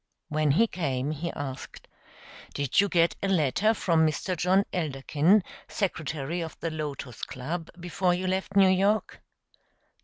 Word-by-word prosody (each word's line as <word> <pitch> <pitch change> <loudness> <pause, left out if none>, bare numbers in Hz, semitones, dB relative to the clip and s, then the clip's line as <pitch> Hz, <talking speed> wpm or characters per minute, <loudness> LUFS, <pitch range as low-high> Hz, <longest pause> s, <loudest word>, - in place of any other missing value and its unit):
When 155 -1 +1
he 165 +12 +4
came 145 - -2
he 155 +3 -3
asked: 135 -3 -7 0.7
"Did 140 +6 +2
you 200 - 0
get 170 -1 +3
a 195 - 0
letter 190 - +2
from 165 -5 +2
Mr. 160 +4 0
John 185 +3 +3
Elderkin, 160 +4 +2 0.2
secretary 160 -4 -3
of 165 -1 -7
the 165 - -3
Lotos 145 -5 -6
Club, 160 +6 -5
before 175 +1 0
you 185 +1 -3
left 190 +1 -2
New 195 -1 +6
York?" 200 +3 +1
165 Hz, 145 wpm, -27 LUFS, 150-190 Hz, 0.7 s, New